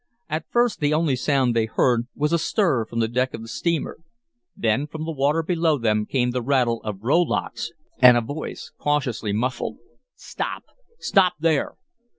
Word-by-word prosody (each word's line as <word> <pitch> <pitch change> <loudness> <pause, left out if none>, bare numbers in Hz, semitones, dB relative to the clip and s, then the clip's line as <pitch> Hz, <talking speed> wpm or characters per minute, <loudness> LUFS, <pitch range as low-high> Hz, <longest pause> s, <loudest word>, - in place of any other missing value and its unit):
At 155 +1 -3
first 240 -1 +2
the 150 0 +2
only 155 -4 +2
sound 130 -2 +1
they 115 -1 +2
heard 120 +1 +1
was 150 +3 0
a 170 - +3
stir 160 - +1
from 115 +1 -3
the 110 - +2
deck 125 +3 -1
of 115 - -8
the - - -9
steamer. 140 +10 -2 0.6
Then 115 +6 +1
from 155 +1 -6
the 165 - -3
water 150 +2 +1
below 165 -2 +1
them 105 -3 0
came 125 -2 +1
the 125 0 -2
rattle 120 -2 +1
of 105 -2 -6
rowlocks 165 +6 0 0.3
and 125 -1 +8
a - - +2
voice 145 +7 -6
cautiously 130 -8 -1
muffled. 125 +5 -2 0.4
"Stop! - - -5 0.3
Stop 190 - +3
there!" 160 -2 +1
135 Hz, 170 wpm, -23 LUFS, 115-155 Hz, 0.6 s, and